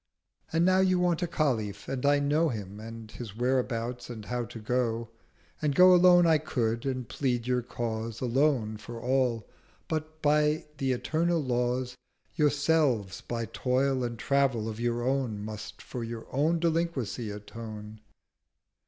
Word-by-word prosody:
50 165 - -3
And 170 - +4
now 185 0 +4
you 185 -1 +3
want 175 -1 +1
a 175 - 0
Khalif: 110 -11 -1
and 130 -2 -3
I 145 0 +5
know 150 +3 +2
Him, 105 -4 -6
and 115 0 -9
his 110 -4 -8
whereabout, 125 -1 -1
and 110 -3 -7
How 125 +1 -2
to 120 0 -10
go: 115 0 -1 0.5
And 145 -2 +1
go 185 +3 +8
alone 180 0 +7
I 160 -2 +5
could, 120 -5 -1
and 130 -3 -2
plead 125 -4 -1
your 125 0 +1
cause 115 -2 -4
Alone 125 -4 +1
for 115 +2 -8
all: 125 -3 0 0.4
but, 155 0 -4
by 150 +1 +3
the 135 -1 +1
eternal 165 +6 +1
laws, 125 -1 -1 0.4
Yourselves 145 - +2
by 115 -1 -3
Toil 130 +2 0
and 120 -1 -3
Travel 135 -3 +1
of 110 0 -5
your 120 0 0
own 125 -6 -1
Must 110 0 -8
for 120 - -5
your 115 0 -6
old 160 +5 +2
Delinquency 160 -10 -1
atone. 105 +1 -8
125 Hz, 155 wpm, -29 LUFS, 115-150 Hz, 0.5 s, go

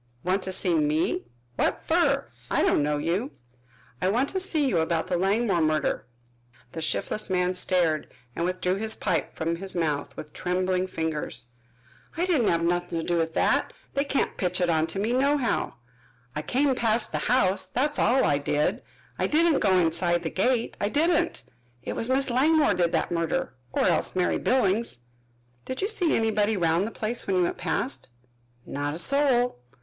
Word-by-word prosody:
"Want 185 +2 +1
to 190 - -3
see 185 -1 0
me? 155 +3 +1 0.3
What - - 0
fer? - - +2 0.2
I - - +2
don't - - +3
know 150 0 0
you." 180 - -1 0.7
"I - - +1
want 245 +7 +1
to 380 - -2
see 320 -6 +1
you 180 -10 +1
about 160 0 0
that 180 - 0
Langmore 195 -1 +1
murder." 155 -6 0 0.6
The 160 - -6
shiftless 205 +6 -2
man 180 0 +1
stared 175 -4 +1 0.3
and 170 - -2
withdrew 185 +1 -1
his 220 +1 0
pipe - - -2
from 165 +1 -2
his 190 +1 -3
mouth 150 -4 -2
with 150 -1 -9
trembling 185 +1 -1
fingers. 160 -8 -4 0.7
"I 345 - +1
didn't 305 - +2
have 165 0 +2
nuthin' 175 0 0
to - - -3
do 175 -1 +1
with 165 -1 -1
that. - - +2 0.2
They 275 - +1
can't 280 -1 -1
pitch 180 -1 0
it 175 -1 +2
onto 160 +3 0
me 215 +5 0
nohow! 275 0 +1 0.6
I 150 - -2
came 270 - +1
past 230 -2 +1
the - - -1
house, 195 -6 +2
that's 270 +10 0
all 255 +4 +3
I 145 - +2
did. 145 +1 0 0.4
I - - +1
didn't 320 0 +3
go 190 -3 +3
inside 170 0 +1
the 160 - -3
gate, 240 +4 0
I 205 - +1
didn't. 335 +5 +1 0.4
It - - -4
was 230 - -1
Miss 265 0 +2
Langmore 290 +1 +3
did 175 -2 +1
that - - 0
murder 165 -5 -1 0.2
or - - 0
else - - +1
Mary 180 -1 +1
Billings." 225 - +1 0.7
"Did 260 +7 -4
you - - +2
see 385 -7 +1
anybody 220 -1 +1
round 170 +3 +1
the - - -6
place 225 +2 -3
when 195 - +1
you 180 - +3
went 175 - -2
past?" 260 - -2 0.6
"Not 145 +1 -3
a - - -5
soul." 250 - +2
185 Hz, 180 wpm, -26 LUFS, 170-245 Hz, 0.7 s, don't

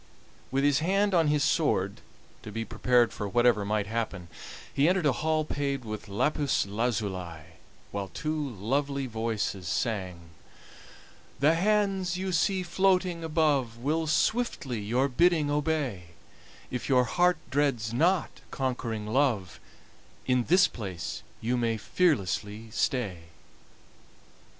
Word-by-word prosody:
With 135 +1 0
his 145 -1 +4
hand 195 +5 +1
on 165 -3 +4
his 150 -1 +2
sword, - - +1 0.4
to 105 - -9
be 115 +2 -3
prepared 125 -1 +2
for 105 -2 -4
whatever 120 -2 +3
might 105 0 0
happen, 100 -5 -4 0.4
he 145 +4 +3
entered 185 -2 +1
a 145 - +5
hall 155 +3 0
paved 140 -4 -2
with 110 0 -6
lapis 145 +7 +1
lazuli, 100 -6 -2 0.5
while 100 -1 -3
two 150 - -3
lovely 135 +6 -1
voices 110 -5 -3
sang: 90 -6 -3 1.1
"The 150 +4 +5
hands 195 -1 +1
you 190 0 -2
see 185 +2 +1
floating 180 -1 +1
above 150 -7 +1
Will 155 +6 -1
swiftly 155 - 0
your 120 +6 +1
bidding 155 +2 +2
obey; 145 - -1 0.7
If 125 +2 -4
your 130 -2 +5
heart 175 +8 +2
dreads 135 -6 0
not 170 +8 +1
conquering 120 -5 -3
Love, 110 -6 0 0.7
In 125 -2 +2
this 180 +3 +5
place 95 -7 -6 0.2
you 120 +3 0
may 115 -2 0
fearlessly 110 - 0
stay." 100 -10 -1
130 Hz, 125 wpm, -28 LUFS, 110-160 Hz, 1.1 s, a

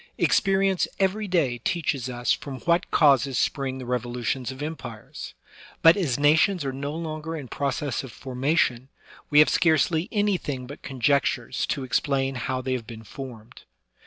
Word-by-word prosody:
Experience 195 -2 +2
every 200 +2 +1
day 150 -10 +1
teaches 140 -2 -1
us 120 -1 -1
from 135 -2 -6
what 170 +1 +1
causes 135 -4 +4
spring 135 -2 -1
the 130 - -7
revolutions 120 0 -2
of 130 +2 -7
empires; 160 +1 -7 0.5
but, 165 +1 +8
as 160 -12 0
na 145 +1 +5
tions 165 0 +2
are 135 - -2
no 140 +2 -4
longer 160 0 -5
in 140 -4 -7
process 140 0 -2
of 130 - -9
formation, 130 0 0 0.4
we 145 - +2
have 150 - +8
scarcely 160 +3 +2
anything 185 - -1
but 140 +4 -10
conjectures 135 -2 0
to 140 - -2
explain 135 +1 0
how 130 +1 -3
they 130 0 -1
have 120 -3 -4
been 110 -2 -9
formed. 120 -2 -10
140 Hz, 160 wpm, -25 LUFS, 125-160 Hz, 0.5 s, but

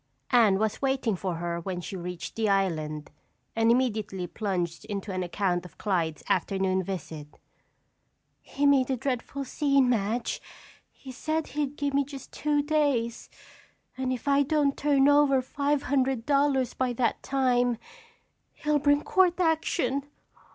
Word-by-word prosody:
Anne 225 -6 +5
was 215 +1 -1
waiting 265 -5 +1
for 185 -1 -3
her 170 0 -3
when 180 +1 -4
she 180 - -6
reached 180 -1 -6
the 220 -2 0
island 155 -6 -1 0.4
and 225 0 +3
immediately 215 -6 0
plunged 175 -3 -3
into 205 -1 -4
an 185 - -2
account 180 0 -1
of 180 - -14
Clyde's 170 -6 -1
afternoon 190 -1 +1
visit. 165 -5 -6 1.1
"He 285 - -2
made 275 -2 +4
a 260 - 0
dreadful 270 +2 -3
scene, 275 -2 +2
Madge. 230 +1 -1 0.5
He 265 - -12
said 310 +5 -2
he'd 290 -1 -2
give 285 -1 -1
me 280 0 +3
just 275 -1 -10
two 295 -1 0
days 285 -7 0 0.7
and 260 0 -2
if 255 +1 -4
I 280 0 +4
don't 285 -1 +1
turn 280 -2 +3
over 285 -2 +5
five 280 +2 -1
hundred 265 -3 0
dollars 280 -3 +2
by 255 -1 -1
that 235 -1 0
time, 245 -3 +1 0.8
he'll 300 0 0
bring 290 +1 +3
court 370 -2 +3
action. 315 -5 +1
250 Hz, 145 wpm, -27 LUFS, 195-280 Hz, 1.1 s, Anne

